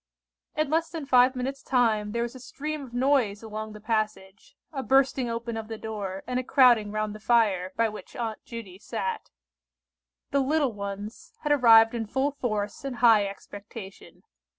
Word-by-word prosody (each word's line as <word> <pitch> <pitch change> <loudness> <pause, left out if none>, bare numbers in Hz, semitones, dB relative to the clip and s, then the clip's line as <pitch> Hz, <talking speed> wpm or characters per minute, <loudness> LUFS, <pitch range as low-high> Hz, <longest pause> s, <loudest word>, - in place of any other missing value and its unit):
In 305 -2 0
less 325 +1 +1
than 320 -3 -6
five 255 -1 +5
minutes' 265 +2 -3
time 220 -5 +1
there 235 +2 -1
was 240 - -4
a 260 - -10
stream 300 +4 -5
of 260 -3 -10
noise 245 -5 +1
along 215 0 -6
the 210 - -10
passage—a 215 +4 -4
bursting 265 -2 +2
open 230 0 -4
of 220 -1 -5
the 225 0 -6
door, 205 -4 -5
and 250 0 -1
a - - -3
crowding 240 -6 +4
round 215 0 -2
the 215 - -9
fire, 210 -5 +2
by 230 - +3
which 215 -1 -9
Aunt 225 -3 -4
Judy 210 -6 -9
sat. 210 -2 -4 1.0
The 280 - +2
"little 280 -2 +1
ones" 200 +1 -7
had 295 - 0
arrived 225 -5 +7
in 225 -2 -3
full 265 +6 0
force 215 -7 -3
and 270 -2 -4
high 225 -4 +5
expectation. 200 0 -10
230 Hz, 175 wpm, -27 LUFS, 210-260 Hz, 1.0 s, arrived